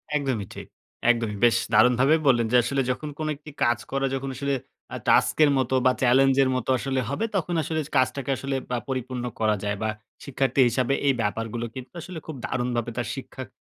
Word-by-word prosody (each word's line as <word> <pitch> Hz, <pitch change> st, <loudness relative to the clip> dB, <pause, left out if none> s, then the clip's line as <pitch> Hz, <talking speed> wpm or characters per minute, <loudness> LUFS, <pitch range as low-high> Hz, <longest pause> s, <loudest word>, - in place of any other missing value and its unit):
একদমই 130 Hz, -9 st, -1 dB
ঠিক। -, -, -8 dB, 0.4 s
একদমই 115 Hz, -3 st, +1 dB
বেশ 120 Hz, -1 st, +6 dB, 0.2 s
দারুণভাবেই 125 Hz, +8 st, +5 dB
বললেন 120 Hz, -4 st, +4 dB
যে, 125 Hz, -, +6 dB
আসলে 135 Hz, +3 st, 0 dB
যখন 150 Hz, +4 st, -4 dB
কোন 155 Hz, -, -2 dB
একটি 150 Hz, +1 st, -12 dB
কাজ 120 Hz, -1 st, +3 dB
করা 135 Hz, 0 st, 0 dB
যখন 135 Hz, 0 st, -4 dB
আসলে 140 Hz, +1 st, -1 dB, 0.4 s
আ -, -, -3 dB
টাস্ক -, -, +4 dB
এর 145 Hz, -, +5 dB
মতো 130 Hz, 0 st, +1 dB
বা 130 Hz, -, +6 dB
চ্যালেঞ্জ 135 Hz, +1 st, +4 dB
এর 130 Hz, -, +1 dB
মতো 130 Hz, -1 st, -3 dB
আসলে 135 Hz, 0 st, -1 dB
হবে, 200 Hz, +11 st, -1 dB
তখন 180 Hz, -2 st, -1 dB
আসলে 160 Hz, +2 st, -2 dB, 0.2 s
কাজটাকে 130 Hz, +1 st, 0 dB
আসলে 135 Hz, 0 st, -3 dB
বা 125 Hz, -, 0 dB
পরিপূর্ণ 130 Hz, -1 st, -3 dB, 0.2 s
করা 110 Hz, -1 st, +2 dB
যায় 100 Hz, 0 st, -1 dB
বা 110 Hz, -, 0 dB, 0.4 s
শিক্ষার্থী 135 Hz, -1 st, +1 dB
হিসাবে 125 Hz, +2 st, 0 dB
এই 135 Hz, -, +5 dB
ব্যাপারগুলো 115 Hz, +2 st, -2 dB
কিন্তু 130 Hz, -1 st, -9 dB
আসলে 175 Hz, 0 st, -7 dB
খুব 160 Hz, -, -6 dB
দারুণভাবে 120 Hz, -2 st, -2 dB
তার 120 Hz, -, -2 dB
শিক্ষার 130 Hz, -1 st, -8 dB
130 Hz, 195 wpm, -25 LUFS, 120-135 Hz, 0.4 s, বেশ